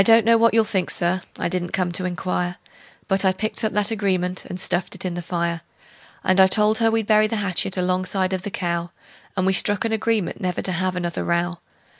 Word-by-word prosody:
I - - +5
don't 225 +1 +6
know 230 0 +5
what 230 0 +3
you'll 225 - +5
think, 190 -4 -2
Sir 185 -1 0 0.2
I - - -1
didn't 175 0 -3
come 180 -2 0
to 185 +1 -1
inquire 180 0 -2 0.5
But 195 0 +1
I 190 - +4
picked 215 +5 -3
up 220 - 0
that 210 +1 +1
agreement 185 -4 -1
and 180 - -6
stuffed 175 +2 -1
it 190 - -4
in 180 - -2
the 175 - -4
fire; 170 -1 -2 0.6
And 185 +1 +2
I 190 - +8
told 210 +2 +3
her 225 -1 +3
we'd 225 -1 0
bury 215 0 +4
the 225 - -3
hatchet 195 -2 0
alongside 185 +1 0
of 185 - -2
the 205 - -5
cow; 170 -3 -3 0.5
And 185 - +1
we 190 - +3
struck 205 +3 +3
an 225 - -1
agreement 220 -3 -1
never 180 -2 -2
to 185 - +1
have 185 +1 -1
another 175 -1 -3
row. 175 0 -1
185 Hz, 230 wpm, -22 LUFS, 180-210 Hz, 0.6 s, I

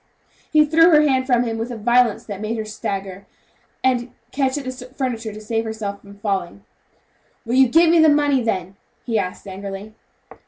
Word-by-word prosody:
He 305 -1 +5
threw 330 +3 +5
her 305 -3 +6
hand 260 -3 +1
from 245 -2 +3
him 225 -2 -3
with 225 +2 -3
a 235 - -5
violence 235 0 +2
that 205 -2 -7
made 220 +2 -3
her 220 - -3
stagger, 195 -2 -5 0.6
and 250 -1 +1 0.2
catch 270 0 0
at 290 - -4
the 255 - -4
furniture 250 -3 -5
to 210 - -9
save 225 +1 -2
herself 220 -3 -5
from 200 0 -15
falling. 195 - -3 0.8
"Will 230 - -3
you 265 0 +6
give 325 +6 +5
me 340 - +5
the 315 -1 +6
money 290 -2 +3
then?" 195 -4 -3 0.3
he 225 -3 0
asked 185 +1 -5
angrily. 195 +2 -7
230 Hz, 190 wpm, -21 LUFS, 205-260 Hz, 0.8 s, her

